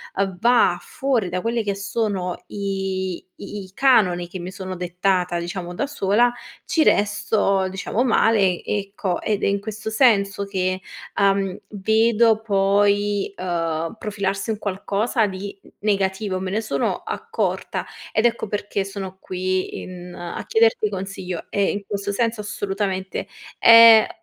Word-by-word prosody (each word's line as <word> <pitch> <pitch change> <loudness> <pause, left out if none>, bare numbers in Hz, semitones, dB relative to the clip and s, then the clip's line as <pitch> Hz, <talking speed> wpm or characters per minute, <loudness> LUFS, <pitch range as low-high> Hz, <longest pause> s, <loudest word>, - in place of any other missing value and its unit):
uhm, 195 -2 -1
va 235 -5 +4
fuori 260 -7 -1
da 180 +1 -2
quelli 230 0 -1
che 200 -1 -1
sono 200 -3 -2
i 195 -2 -3 0.2
i 200 -2 -7
canoni 185 -10 +3
che 185 - -7
mi 175 +1 -6
sono 185 0 -6
dettata, 180 0 0
diciamo, 175 +1 -5
da 280 - -1
sola, 240 -2 +2 0.3
ci 320 - +1
resto, 205 -3 +2
diciamo, 190 +4 -2
male, 210 -6 +3
ecco, 195 -2 -2
ed 210 -2 -1
è - - +3
in 200 0 +1
questo 215 +1 -6
senso 205 -4 +3
che, 185 -1 -1 0.4
uhm, 195 -1 +2
vedo 220 +2 +3
poi, 205 0 +2
uhm, 165 -2 -2
profilarsi 200 0 -2
un 215 - -3
qualcosa 205 +4 0
di 195 +1 -7
n - - -17
negativo. 195 -1 0
Me 185 0 -4
ne 215 +3 0
sono 215 - -1
accorta 460 +1 -3 0.3
ed 220 - +2
ecco 235 -2 +1
perché 205 -1 -2
sono 195 -1 -7
qui 185 0 -2
in 180 -1 -9
a 175 -1 -6
chiederti 455 0 +3
consiglio 190 - -5
e, 200 - 0
in 205 - -4
questo 200 0 -3
senso, 230 +1 0
assolutamente, 195 -2 -3 0.3
è 230 -1 +9
200 Hz, 140 wpm, -22 LUFS, 185-215 Hz, 0.4 s, è